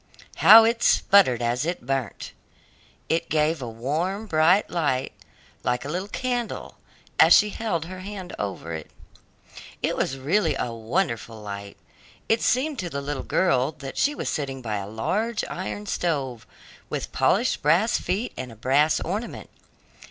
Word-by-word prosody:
how 225 Hz, +1 st, +9 dB
it 230 Hz, +1 st, +1 dB
sputtered 130 Hz, -, +4 dB
as 120 Hz, +2 st, 0 dB
it 170 Hz, -5 st, -3 dB
burnt! 135 Hz, -4 st, -3 dB, 0.8 s
It 165 Hz, +1 st, 0 dB
gave 155 Hz, 0 st, +1 dB
a 120 Hz, -, -4 dB
warm, 155 Hz, -, -2 dB
bright 175 Hz, +2 st, +3 dB
light, 145 Hz, -7 st, -1 dB, 0.5 s
like 125 Hz, +1 st, -1 dB
a -, -, -5 dB
little 180 Hz, +5 st, -3 dB
candle, 245 Hz, +1 st, -4 dB, 0.4 s
as -, -, +8 dB
she 210 Hz, 0 st, +4 dB
held 190 Hz, -9 st, -2 dB
her 185 Hz, +2 st, -8 dB
hand 190 Hz, -1 st, -7 dB
over 95 Hz, -5 st, -4 dB
it. 80 Hz, -1 st, -6 dB, 0.9 s
It -, -, +1 dB
was 135 Hz, -, -1 dB
really 165 Hz, +11 st, +1 dB
a 120 Hz, -, -3 dB
wonderful 115 Hz, -, -2 dB
light. 100 Hz, -1 st, -8 dB, 0.5 s
It 225 Hz, 0 st, +2 dB
seemed 275 Hz, +3 st, +1 dB
to 180 Hz, -, -3 dB
the 140 Hz, -, -4 dB
little 140 Hz, -1 st, -4 dB
girl 145 Hz, -5 st, +1 dB
that 140 Hz, -2 st, -8 dB
she 295 Hz, +1 st, +1 dB
was -, -, -4 dB
sitting 135 Hz, -3 st, -3 dB
by 110 Hz, -4 st, -3 dB
a 100 Hz, -1 st, -5 dB
large 210 Hz, -, -1 dB
iron 195 Hz, +3 st, -5 dB
stove, 140 Hz, -, -2 dB, 0.4 s
with -, -, -4 dB
polished -, -, +1 dB
brass 175 Hz, +10 st, +3 dB
feet 210 Hz, +7 st, -2 dB
and 130 Hz, -2 st, -6 dB
a -, -, -12 dB
brass 140 Hz, +7 st, +2 dB
ornament. 205 Hz, +7 st, -5 dB
155 Hz, 155 wpm, -25 LUFS, 125-195 Hz, 0.9 s, how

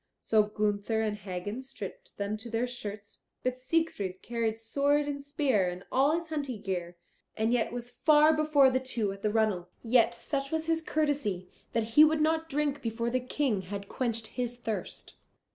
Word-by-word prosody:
So 220 Hz, -1 st, +4 dB
Gunther 210 Hz, +1 st, 0 dB
and 215 Hz, -1 st, 0 dB
Hagen 205 Hz, +3 st, -5 dB
stripped -, -, -9 dB
them 200 Hz, +1 st, -2 dB
to 225 Hz, +2 st, -9 dB
their 230 Hz, +2 st, 0 dB
shirts, 210 Hz, -4 st, -7 dB, 0.2 s
but 255 Hz, 0 st, -1 dB
Siegfried 255 Hz, -, -1 dB
carried 230 Hz, -2 st, -1 dB
sword 285 Hz, +6 st, +1 dB
and 285 Hz, -1 st, -3 dB
spear, 220 Hz, -, 0 dB
all 275 Hz, +4 st, +4 dB
his 335 Hz, 0 st, -2 dB
hunting 280 Hz, -8 st, -3 dB
gear, 175 Hz, -3 st, -3 dB, 0.4 s
and 220 Hz, +2 st, +2 dB
yet 240 Hz, -2 st, +1 dB
was 245 Hz, 0 st, -6 dB
far 305 Hz, 0 st, +5 dB
before 300 Hz, -3 st, +5 dB
the 260 Hz, -, +2 dB
two 240 Hz, -6 st, -2 dB
at 195 Hz, 0 st, -9 dB
the 215 Hz, -, +1 dB
runnel. 210 Hz, -5 st, +1 dB
Yet, 235 Hz, 0 st, +4 dB
such 275 Hz, +1 st, -3 dB
was 320 Hz, 0 st, 0 dB
his 325 Hz, 0 st, +1 dB
courtesy, 285 Hz, -, -1 dB, 0.2 s
that 230 Hz, -, +2 dB
he 300 Hz, -, +9 dB
would 310 Hz, 0 st, +4 dB
not 320 Hz, +1 st, +1 dB
drink 290 Hz, -1 st, 0 dB
before 230 Hz, 0 st, -2 dB
the 255 Hz, -, +2 dB
King 250 Hz, -4 st, 0 dB
had 200 Hz, +2 st, -6 dB
quenched 230 Hz, -2 st, -2 dB, 0.2 s
his 245 Hz, 0 st, -2 dB
thirst. 225 Hz, -3 st, -5 dB
240 Hz, 180 wpm, -30 LUFS, 210-285 Hz, 0.4 s, he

